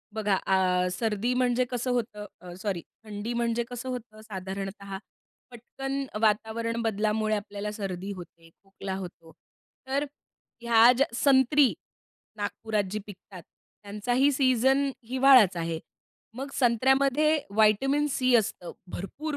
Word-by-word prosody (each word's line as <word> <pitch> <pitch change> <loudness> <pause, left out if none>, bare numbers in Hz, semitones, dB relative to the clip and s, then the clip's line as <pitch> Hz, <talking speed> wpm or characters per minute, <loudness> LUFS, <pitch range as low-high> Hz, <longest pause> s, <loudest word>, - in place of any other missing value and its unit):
बघा 210 -3 +1
अ, 185 -1 +2
सर्दी 225 +4 -1
म्हणजे 250 0 +2
कसं 245 +1 -1
होतं? 215 -4 -2 0.2
अ, 180 -1 -9
सॉरी, 195 -5 -2 0.2
थंडी 215 +2 -5
म्हणजे 235 0 0
कसं 250 +1 -6
होतं, 220 -3 -7
साधारणतः 195 0 -6 0.5
पटकन 270 +3 -5 0.2
वातावरण 225 +2 0
बदलामुळे 215 0 0
आपल्याला 205 0 -5
सर्दी 195 -2 -5
होते, 170 -2 -13
खोकला 195 0 -7
होतो. 170 -3 -9 0.6
तर 280 +2 0 0.6
ह्या 235 0 +6
ज्या 275 +4 +3
संत्री, 270 +1 +4 0.6
नागपुरात 210 0 -2
जी 215 - -2
पिकतात, 190 -2 -12 0.4
त्यांचाही 245 +7 +1
सीझन 265 +1 +3 0.2
हिवाळाच 255 -8 +6
आहे. 165 -1 -2 0.6
मग 275 +2 -5
संत्र्यामध्ये 265 +5 +3 0.2
व्हिटॅमिन 270 +8 +3
सी 255 -2 +2
असतं 195 -5 -2 0.2
भरपूर 285 - -5
220 Hz, 120 wpm, -27 LUFS, 200-255 Hz, 0.6 s, ह्या